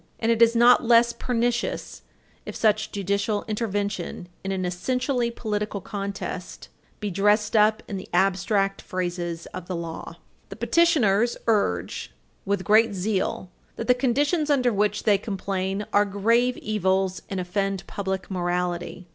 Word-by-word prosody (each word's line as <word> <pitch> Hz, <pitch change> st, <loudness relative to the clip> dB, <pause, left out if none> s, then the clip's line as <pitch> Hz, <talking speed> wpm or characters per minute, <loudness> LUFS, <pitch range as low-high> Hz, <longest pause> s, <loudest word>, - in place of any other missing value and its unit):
And 225 Hz, 0 st, +1 dB
it 230 Hz, 0 st, +1 dB
is 230 Hz, 0 st, +6 dB
not 240 Hz, +2 st, +6 dB
less 235 Hz, 0 st, +5 dB
pernicious 240 Hz, 0 st, -2 dB, 0.4 s
if -, -, -7 dB
such 215 Hz, -1 st, +1 dB
judicial 200 Hz, +1 st, -1 dB
intervention 205 Hz, -5 st, -3 dB
in 195 Hz, -, -3 dB
an 185 Hz, -1 st, -1 dB
essentially 250 Hz, +7 st, -1 dB
political 210 Hz, -3 st, -3 dB
contest 200 Hz, +1 st, -6 dB, 0.3 s
be 210 Hz, -2 st, -3 dB
dressed 210 Hz, +3 st, +2 dB
up 215 Hz, 0 st, +4 dB
in 200 Hz, -, -4 dB
the 190 Hz, -, -9 dB
abstract 195 Hz, +1 st, +1 dB
phrases 175 Hz, -2 st, -4 dB
of 185 Hz, -1 st, -7 dB
the 185 Hz, -, -3 dB
law. 165 Hz, -1 st, -6 dB, 0.3 s
The -, -, -9 dB
appellants 240 Hz, -, +3 dB
urge 200 Hz, -, 0 dB, 0.3 s
with 200 Hz, -1 st, 0 dB
great 215 Hz, 0 st, +4 dB
zeal 190 Hz, -1 st, -2 dB, 0.2 s
that 230 Hz, -, -4 dB
the 250 Hz, -, +5 dB
conditions 290 Hz, +5 st, +1 dB
of 275 Hz, -4 st, +2 dB
which 210 Hz, 0 st, 0 dB
they 205 Hz, -2 st, +4 dB
complain 195 Hz, 0 st, -3 dB
are 205 Hz, -, +5 dB
grave 230 Hz, +5 st, +2 dB
evils, 190 Hz, -3 st, 0 dB
and 195 Hz, -, -3 dB
offend 195 Hz, +1 st, -2 dB
public 190 Hz, -1 st, -4 dB
morality. 175 Hz, 0 st, -2 dB
205 Hz, 140 wpm, -25 LUFS, 190-230 Hz, 0.4 s, is